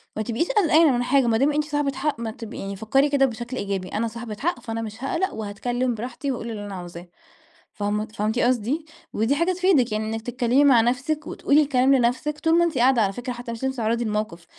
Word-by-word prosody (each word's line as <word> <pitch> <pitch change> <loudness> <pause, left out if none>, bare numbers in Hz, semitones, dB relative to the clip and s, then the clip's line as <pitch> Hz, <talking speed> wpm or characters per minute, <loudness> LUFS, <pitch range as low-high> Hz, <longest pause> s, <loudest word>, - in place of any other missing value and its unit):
ما 215 - -2
تبقيش 240 +10 -1
قلقانة 330 - +4
من 245 -1 0
حاجة 270 +1 +3
ما 225 -1 +3
دام 275 +5 +3
أنتِ 300 +1 +1
صاحبة 290 -1 -1
حق. 280 -1 -2
ما 230 -1 -3
تب 225 0 -9
يعني 195 0 -5
فكري 245 +8 +2
كده 280 -1 +3
بشكل 240 +1 -5
إيجابي، 195 -3 -3
أنا 225 +2 -1
صاحبة 225 -1 -7
حق، 325 -3 -1
فأنا 225 -1 -4
مش 220 +2 -7
هاقلق، 380 +8 -1
وهاتكلم 240 +4 -2
براحتي 245 +5 -4
وأقول 235 -2 -5
اللي 205 -2 -6
أنا 200 -1 -6
عاوزاه. 175 -1 -9 0.7
فهم 210 +1 -2
فهمتِ 215 +1 -2
قصدي؟ 255 +5 0 0.3
ودي 225 +6 +1
حاجة 335 +5 +1
تفيدِك 360 - +2
يعني، 215 0 -1
إنك 225 +1 -3
تتكلمي 245 +3 +1
مع 265 -5 +6
نفسِك 280 +6 -1
وتقولي 290 +2 +2
الكلام 270 -2 +3
لنفسِك 260 +5 0
طول 325 +1 +3
ما 345 - +5
أنتِ 330 -5 -2
قاعدة، 250 0 +4
على 195 -2 +1
فكرة، 245 +3 -5
حتى 240 0 -7
مش 230 +2 -7
لازم 265 0 0
تتعرضي 230 0 0
للموقف. 210 -5 -3
245 Hz, 220 wpm, -24 LUFS, 220-280 Hz, 0.7 s, مع